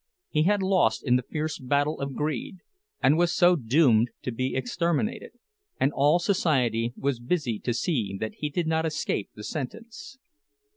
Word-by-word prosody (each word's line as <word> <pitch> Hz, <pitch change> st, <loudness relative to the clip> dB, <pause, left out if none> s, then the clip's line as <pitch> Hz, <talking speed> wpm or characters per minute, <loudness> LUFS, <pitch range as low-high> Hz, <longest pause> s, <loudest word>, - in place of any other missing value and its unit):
He 150 Hz, -, +1 dB
had 205 Hz, +1 st, +2 dB
lost 185 Hz, -, +2 dB
in 125 Hz, -3 st, +3 dB
the 125 Hz, -, +2 dB
fierce 155 Hz, +4 st, -4 dB
battle 145 Hz, +4 st, 0 dB
of 140 Hz, -1 st, -4 dB
greed, 150 Hz, +4 st, -3 dB, 0.4 s
and -, -, +6 dB, 0.2 s
so 175 Hz, +1 st, +4 dB
was 175 Hz, -5 st, 0 dB
doomed 120 Hz, -2 st, +4 dB
to 125 Hz, -, -2 dB
be 130 Hz, +3 st, -2 dB
exterminated; 170 Hz, -, -1 dB, 0.5 s
and 135 Hz, -, +2 dB
all 145 Hz, +4 st, +4 dB
society 130 Hz, -, +1 dB
was 140 Hz, -3 st, -1 dB
busied 120 Hz, -4 st, -2 dB
to 120 Hz, -, +1 dB
see 115 Hz, -, -1 dB
that 110 Hz, -, -3 dB
he 150 Hz, -, -2 dB
did 170 Hz, +4 st, -1 dB
not 160 Hz, 0 st, +1 dB
escape 150 Hz, -9 st, -2 dB
the 105 Hz, -, -9 dB
sentence. 220 Hz, -, -7 dB
145 Hz, 165 wpm, -26 LUFS, 120-170 Hz, 0.5 s, and